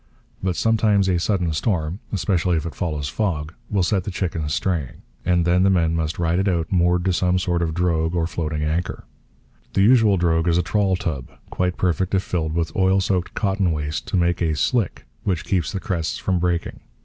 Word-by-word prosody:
But 90 Hz, -2 st, -1 dB
sometimes 105 Hz, -3 st, +2 dB
a 90 Hz, -2 st, +2 dB
sudden 90 Hz, -3 st, 0 dB
storm, 80 Hz, +1 st, -1 dB
especially 90 Hz, -2 st, +1 dB
if 80 Hz, -, -3 dB
it 85 Hz, -, -5 dB
follows 75 Hz, -1 st, -3 dB
fog, 80 Hz, -4 st, -2 dB, 0.2 s
will 100 Hz, -3 st, +1 dB
set 95 Hz, 0 st, +1 dB
the -, -, -4 dB
chickens 85 Hz, -5 st, -2 dB
straying; 85 Hz, -9 st, -2 dB, 0.2 s
and 90 Hz, -1 st, +2 dB
then 90 Hz, +1 st, +3 dB
the 95 Hz, -, +4 dB
men 85 Hz, -4 st, +2 dB
must 80 Hz, -1 st, -1 dB
ride 85 Hz, +1 st, +1 dB
it 95 Hz, -, +1 dB
out 85 Hz, -3 st, 0 dB
moored 90 Hz, -1 st, +2 dB
to 95 Hz, -, +2 dB
some 90 Hz, +1 st, +2 dB
sort 90 Hz, -1 st, 0 dB
of 80 Hz, -2 st, -1 dB
drogue 85 Hz, -1 st, +1 dB
or 85 Hz, -1 st, +1 dB
floating 80 Hz, -3 st, -3 dB
anchor. 80 Hz, +4 st, -2 dB, 0.7 s
The 95 Hz, -, +3 dB
usual 110 Hz, -3 st, +5 dB
drogue 80 Hz, -1 st, +1 dB
is 85 Hz, 0 st, +3 dB
a 90 Hz, -, +2 dB
trawl 100 Hz, +1 st, +1 dB
tub, 75 Hz, -8 st, -4 dB, 0.2 s
quite 90 Hz, 0 st, -1 dB
perfect 95 Hz, +2 st, 0 dB
if 95 Hz, -, +1 dB
filled 80 Hz, -3 st, -2 dB
with 80 Hz, -2 st, -1 dB
oil 95 Hz, 0 st, +3 dB
soaked 90 Hz, -2 st, -1 dB
cotton 95 Hz, -3 st, +1 dB
waste 75 Hz, -1 st, -3 dB
to -, -, 0 dB
make 85 Hz, 0 st, +1 dB
a 80 Hz, -2 st, +1 dB
'slick' 115 Hz, +4 st, 0 dB, 0.2 s
which 90 Hz, -5 st, -1 dB
keeps 90 Hz, -7 st, 0 dB
the 95 Hz, -, -3 dB
crests 85 Hz, -4 st, -2 dB
from 95 Hz, -2 st, 0 dB
breaking. 85 Hz, -1 st, -1 dB
90 Hz, 205 wpm, -22 LUFS, 80-95 Hz, 0.7 s, usual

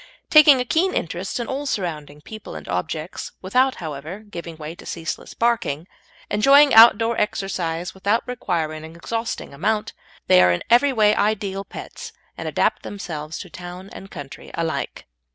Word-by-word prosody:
Taking 300 Hz, -3 st, +8 dB
a 250 Hz, -, -1 dB
keen 340 Hz, +9 st, +1 dB
interest 175 Hz, +7 st, -3 dB
in 240 Hz, -, -2 dB
all 280 Hz, +3 st, -4 dB
surrounding 155 Hz, -, -4 dB
people 215 Hz, -, -9 dB
and 75 Hz, -, -9 dB
objects, 155 Hz, -, -4 dB
without, 255 Hz, +8 st, +2 dB
however, 160 Hz, +4 st, -7 dB
giving 170 Hz, -6 st, -8 dB
way 155 Hz, 0 st, -7 dB
to -, -, -14 dB
ceaseless 165 Hz, -2 st, -5 dB
barking; 220 Hz, -10 st, 0 dB, 0.4 s
enjoying 275 Hz, +7 st, +5 dB
outdoor 225 Hz, 0 st, +7 dB
exercise, 180 Hz, -4 st, -2 dB
without 200 Hz, +4 st, 0 dB
requiring 165 Hz, -10 st, -2 dB
an 160 Hz, +1 st, -10 dB
exhausting 225 Hz, 0 st, -4 dB
amount, 210 Hz, +8 st, -1 dB, 0.3 s
they 90 Hz, -, +6 dB
are 90 Hz, 0 st, +5 dB
in 90 Hz, -, -1 dB
every 275 Hz, +4 st, +5 dB
way 215 Hz, -4 st, +4 dB
ideal 200 Hz, -2 st, 0 dB
pets, -, -, -9 dB, 0.2 s
and -, -, -6 dB
adapt -, -, +1 dB
themselves 160 Hz, -6 st, -6 dB
to 185 Hz, -, -8 dB
town 180 Hz, +2 st, -9 dB
and 195 Hz, -, -10 dB
country 140 Hz, -5 st, -9 dB
alike. 165 Hz, -1 st, -3 dB
190 Hz, 155 wpm, -22 LUFS, 160-225 Hz, 0.4 s, Taking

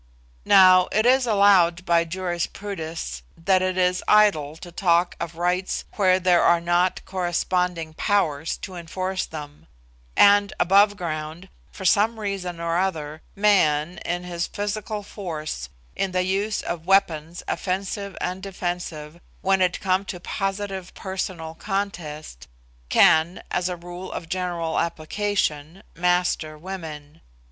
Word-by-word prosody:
Now, 185 Hz, -2 st, +7 dB
it 215 Hz, +2 st, +2 dB
is 255 Hz, 0 st, +4 dB
allowed 190 Hz, -5 st, +4 dB
by 170 Hz, -1 st, +3 dB
jurisprudists 170 Hz, -, -4 dB, 0.2 s
that 185 Hz, +2 st, +2 dB
it 185 Hz, 0 st, -1 dB
is 180 Hz, 0 st, +1 dB
idle 175 Hz, -9 st, +4 dB
to 175 Hz, -, -10 dB
talk 175 Hz, 0 st, +2 dB
of 170 Hz, 0 st, -5 dB
rights 180 Hz, +2 st, -1 dB
where 185 Hz, -2 st, +3 dB
there 180 Hz, -1 st, +4 dB
are 170 Hz, 0 st, +4 dB
not 175 Hz, +2 st, +1 dB
corresponding 180 Hz, -2 st, -1 dB
powers 160 Hz, -6 st, 0 dB
to 190 Hz, -, -6 dB
enforce 185 Hz, +2 st, -3 dB
them; 150 Hz, -2 st, -9 dB, 0.5 s
and 205 Hz, 0 st, +6 dB
above 200 Hz, +3 st, +4 dB
ground, 160 Hz, +1 st, -5 dB, 0.2 s
for 190 Hz, -, -8 dB
some 220 Hz, +4 st, +3 dB
reason 190 Hz, -4 st, -4 dB
or 170 Hz, +1 st, 0 dB
other, 160 Hz, -5 st, -2 dB
man, 180 Hz, -6 st, +2 dB
in 175 Hz, +1 st, -3 dB
his 175 Hz, -1 st, -3 dB
physical 210 Hz, 0 st, -4 dB
force, 155 Hz, -, -6 dB, 0.3 s
in 190 Hz, -2 st, -2 dB
the 185 Hz, 0 st, +2 dB
use 200 Hz, +3 st, -1 dB
of 170 Hz, 0 st, -5 dB
weapons 170 Hz, -4 st, +1 dB
offensive 195 Hz, +1 st, -3 dB
and 185 Hz, +1 st, -3 dB
defensive, 175 Hz, -4 st, -5 dB, 0.2 s
when 190 Hz, 0 st, +2 dB
it 180 Hz, -1 st, +1 dB
come 190 Hz, 0 st, +1 dB
to 180 Hz, -, -6 dB
positive 195 Hz, 0 st, -4 dB
personal 185 Hz, -4 st, -5 dB
contest, 160 Hz, -, -5 dB, 0.4 s
can, 160 Hz, +3 st, +4 dB
as 180 Hz, 0 st, 0 dB
a 180 Hz, -, -3 dB
rule 175 Hz, +2 st, -8 dB
of 165 Hz, -, -6 dB
general 175 Hz, -2 st, -2 dB
application, 170 Hz, -1 st, -2 dB
master 175 Hz, -3 st, 0 dB
women. 160 Hz, -4 st, -8 dB
180 Hz, 130 wpm, -24 LUFS, 165-195 Hz, 0.5 s, Now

